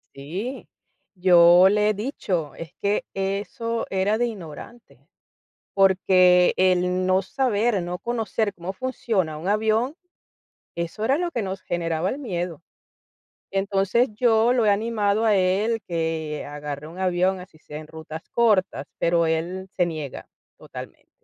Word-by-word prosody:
sí, 185 Hz, -, -6 dB, 0.4 s
yo 180 Hz, 0 st, +6 dB
le 210 Hz, +1 st, +2 dB
he -, -, +2 dB
dicho, 195 Hz, -, -3 dB
es 165 Hz, -3 st, -8 dB
que 205 Hz, +1 st, +1 dB
eso 205 Hz, +4 st, -3 dB
era 195 Hz, +3 st, +1 dB
de 240 Hz, -, +1 dB
ignorante, 210 Hz, +3 st, -11 dB, 0.7 s
porque 185 Hz, -2 st, +5 dB
el 185 Hz, 0 st, +2 dB
no 185 Hz, +1 st, +3 dB
saber, 220 Hz, -1 st, 0 dB
no 175 Hz, +1 st, -4 dB
conocer 225 Hz, -2 st, -2 dB
cómo 175 Hz, +1 st, -6 dB
funciona 215 Hz, -, -2 dB
un 160 Hz, +5 st, -5 dB
avión, 220 Hz, +7 st, +1 dB, 0.8 s
eso 170 Hz, +5 st, -4 dB
era 270 Hz, +6 st, +2 dB
lo 350 Hz, 0 st, -2 dB
que 235 Hz, -, -2 dB
nos 190 Hz, -1 st, -4 dB
generaba 170 Hz, 0 st, -1 dB
el 265 Hz, -, -3 dB
miedo. 175 Hz, -, -4 dB, 0.9 s
Entonces, 195 Hz, +5 st, +1 dB
yo 230 Hz, +1 st, +3 dB
lo 240 Hz, -3 st, +2 dB
he 210 Hz, -, +4 dB
animado 215 Hz, 0 st, +1 dB
a 210 Hz, -2 st, +4 dB
él, 200 Hz, +5 st, +1 dB
que 160 Hz, -3 st, -3 dB
agarre 145 Hz, 0 st, -6 dB
un 170 Hz, -, -11 dB
avión, 185 Hz, 0 st, +1 dB
así 180 Hz, -3 st, -14 dB
sea 150 Hz, -, -10 dB
en 155 Hz, 0 st, -9 dB
rutas 160 Hz, 0 st, -8 dB
cortas, 200 Hz, -, +2 dB
pero 170 Hz, 0 st, +2 dB
él 175 Hz, +4 st, -2 dB
se 180 Hz, -, +3 dB
niega 155 Hz, -5 st, -6 dB, 0.3 s
totalmente. -, -, -11 dB
190 Hz, 140 wpm, -24 LUFS, 170-220 Hz, 0.9 s, yo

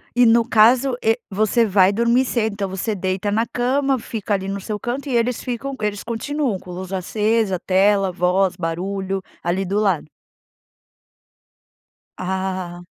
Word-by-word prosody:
E 245 Hz, -, +5 dB
no 230 Hz, 0 st, +5 dB
caso 245 Hz, +3 st, +4 dB
e 225 Hz, +2 st, +2 dB
você 215 Hz, +4 st, +2 dB
vai 195 Hz, -2 st, +4 dB
dormir 235 Hz, +4 st, +2 dB
cedo, 220 Hz, -4 st, 0 dB
então 200 Hz, -1 st, -3 dB
você 195 Hz, +3 st, -2 dB
deita 190 Hz, +2 st, -2 dB
na 225 Hz, +3 st, +1 dB
cama 265 Hz, +3 st, 0 dB
fica 220 Hz, -2 st, -4 dB
ali 190 Hz, -1 st, -1 dB
no 195 Hz, 0 st, -3 dB
seu 210 Hz, +1 st, -4 dB
canto 270 Hz, +6 st, -4 dB
e 245 Hz, -, 0 dB
eles 235 Hz, +1 st, +1 dB
ficam 255 Hz, +3 st, -4 dB
eles 205 Hz, -1 st, -2 dB
continuam 235 Hz, -1 st, -2 dB
com 180 Hz, -, -11 dB
luz 185 Hz, +1 st, -7 dB
acesa, 210 Hz, +1 st, 0 dB
tela, 195 Hz, 0 st, +2 dB
voz, 180 Hz, +1 st, +1 dB
barulho, 190 Hz, +3 st, -3 dB, 0.2 s
ali 185 Hz, +3 st, 0 dB
do 200 Hz, +3 st, 0 dB
lado? 190 Hz, -8 st, +1 dB, 2.1 s
Ah 185 Hz, -1 st, -3 dB
205 Hz, 155 wpm, -21 LUFS, 190-235 Hz, 2.1 s, E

